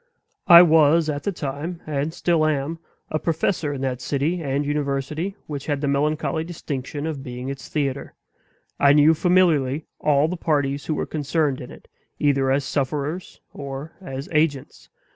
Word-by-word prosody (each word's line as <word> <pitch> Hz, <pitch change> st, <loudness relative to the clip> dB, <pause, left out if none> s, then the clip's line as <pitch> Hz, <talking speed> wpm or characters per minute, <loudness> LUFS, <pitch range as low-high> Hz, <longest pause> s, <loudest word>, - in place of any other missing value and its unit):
I 170 Hz, -1 st, +11 dB
was 160 Hz, -1 st, +4 dB
at 145 Hz, -1 st, -2 dB
the 200 Hz, -, -1 dB
time, 160 Hz, +2 st, -5 dB
and 150 Hz, 0 st, -2 dB
still 165 Hz, -2 st, +1 dB
am, 155 Hz, +2 st, -1 dB, 0.3 s
a 155 Hz, -, 0 dB
professor 165 Hz, -1 st, -1 dB
in 140 Hz, -2 st, -5 dB
that 130 Hz, -2 st, -2 dB
city 145 Hz, +7 st, -1 dB
and 140 Hz, -1 st, -1 dB
university 145 Hz, +5 st, -2 dB
which 145 Hz, -3 st, -6 dB
had 145 Hz, -2 st, 0 dB
the 145 Hz, -, -2 dB
melancholy 150 Hz, +3 st, 0 dB
distinction 145 Hz, -3 st, -5 dB
of 155 Hz, -4 st, -4 dB
being 125 Hz, -1 st, -6 dB
its 135 Hz, 0 st, -7 dB
theater. 140 Hz, -3 st, -2 dB, 0.6 s
I 140 Hz, 0 st, +6 dB
knew 150 Hz, +2 st, +6 dB
familiarly 160 Hz, -5 st, +2 dB
all 150 Hz, 0 st, +3 dB
the 180 Hz, +2 st, -4 dB
parties 145 Hz, -4 st, -1 dB
who 155 Hz, -, 0 dB
were -, -, -2 dB
concerned 150 Hz, -2 st, -1 dB
in 125 Hz, -, -8 dB
it, -, -, -14 dB, 0.3 s
either 140 Hz, -3 st, +2 dB
as 135 Hz, +1 st, +2 dB
sufferers 145 Hz, +6 st, -3 dB
or 140 Hz, +2 st, -7 dB
as 135 Hz, -5 st, -6 dB
agents. 150 Hz, -4 st, -1 dB
145 Hz, 160 wpm, -23 LUFS, 140-160 Hz, 0.6 s, I